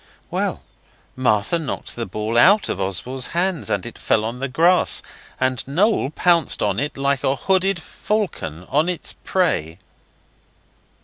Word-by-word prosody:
Well, -, -, -2 dB, 0.5 s
Martha 130 Hz, +5 st, +1 dB
knocked 155 Hz, -4 st, -4 dB
the 115 Hz, -1 st, -4 dB
ball 110 Hz, +4 st, -3 dB
out 200 Hz, -, +5 dB
of -, -, -2 dB
Oswald's 125 Hz, +8 st, -2 dB
hands, 180 Hz, -3 st, 0 dB
and 100 Hz, -, -1 dB
it 120 Hz, -, -9 dB
fell 110 Hz, -1 st, +1 dB
on 120 Hz, +3 st, -4 dB
the 135 Hz, -, -2 dB
grass, 170 Hz, +7 st, +3 dB, 0.4 s
and 130 Hz, -1 st, 0 dB
Noel 180 Hz, +1 st, +2 dB
pounced 170 Hz, 0 st, +2 dB
on 100 Hz, 0 st, 0 dB
it 145 Hz, +1 st, -3 dB
like 140 Hz, 0 st, 0 dB
a 135 Hz, -, +2 dB
hooded 190 Hz, +3 st, +1 dB
falcon 160 Hz, -, -3 dB
on 155 Hz, +5 st, +3 dB
its 180 Hz, -, -2 dB
prey. 85 Hz, -, -1 dB
135 Hz, 145 wpm, -21 LUFS, 115-175 Hz, 0.5 s, out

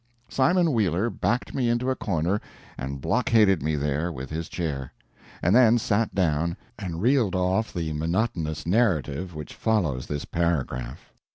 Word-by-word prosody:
Simon 170 Hz, +5 st, +3 dB
Wheeler 105 Hz, 0 st, +1 dB
backed 120 Hz, +5 st, -1 dB
me 125 Hz, -3 st, +1 dB
into 120 Hz, +2 st, +1 dB
a -, -, 0 dB
corner 95 Hz, 0 st, -1 dB, 0.3 s
and 70 Hz, +2 st, -5 dB
blockaded 110 Hz, -, +3 dB
me 75 Hz, +2 st, 0 dB
there 75 Hz, +4 st, -1 dB
with 65 Hz, -4 st, -7 dB
his 80 Hz, +1 st, -4 dB
chair, 70 Hz, -7 st, -3 dB, 0.5 s
and 90 Hz, +5 st, +4 dB
then 120 Hz, -2 st, +6 dB
sat 110 Hz, 0 st, 0 dB
down 85 Hz, -2 st, +1 dB, 0.2 s
and 90 Hz, -3 st, -4 dB
reeled 120 Hz, -7 st, +3 dB
off 95 Hz, +4 st, +1 dB
the 80 Hz, -4 st, -3 dB
monotonous 80 Hz, 0 st, -1 dB
narrative 90 Hz, -, +1 dB
which 75 Hz, -1 st, -7 dB
follows 85 Hz, -, 0 dB
this 75 Hz, 0 st, -3 dB
paragraph. 85 Hz, -8 st, -2 dB
90 Hz, 150 wpm, -26 LUFS, 75-110 Hz, 0.5 s, then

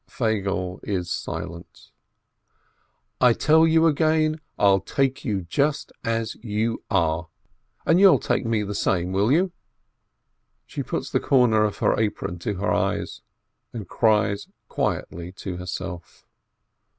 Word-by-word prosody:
Feigele 100 Hz, -5 st, -2 dB
is 90 Hz, -4 st, -3 dB
silent. 85 Hz, 0 st, -6 dB, 1.3 s
"I 125 Hz, -2 st, +6 dB
tell 160 Hz, +6 st, +4 dB
you 160 Hz, 0 st, +4 dB
again, 155 Hz, 0 st, +2 dB, 0.2 s
I'll 100 Hz, -1 st, +4 dB
take 135 Hz, +7 st, -1 dB
you 105 Hz, -8 st, -1 dB
just 140 Hz, -, -1 dB
as 115 Hz, -1 st, -1 dB
you 110 Hz, 0 st, -2 dB
are 85 Hz, -4 st, +1 dB, 0.3 s
— -, -, -42 dB
and 165 Hz, +2 st, +4 dB
you'll 195 Hz, -2 st, +7 dB
take -, -, -1 dB
me 115 Hz, -2 st, 0 dB
the 105 Hz, 0 st, -4 dB
same, 90 Hz, -2 st, 0 dB
will 100 Hz, +5 st, +2 dB
you 180 Hz, +5 st, +3 dB, 0.6 s
?" -, -, -51 dB
She -, -, -5 dB
puts -, -, -4 dB
the -, -, +2 dB
corner 120 Hz, -5 st, +3 dB
of 105 Hz, -1 st, -1 dB
her -, -, +1 dB
apron 105 Hz, -5 st, -2 dB
to 100 Hz, +4 st, -3 dB
her 100 Hz, +3 st, 0 dB
eyes, -, -, -1 dB, 0.5 s
and 110 Hz, -6 st, -6 dB
cries 105 Hz, -2 st, +1 dB, 0.2 s
quietly 85 Hz, +1 st, -3 dB
to 90 Hz, -1 st, -6 dB
herself. 90 Hz, -1 st, -7 dB
105 Hz, 140 wpm, -24 LUFS, 95-135 Hz, 1.3 s, you'll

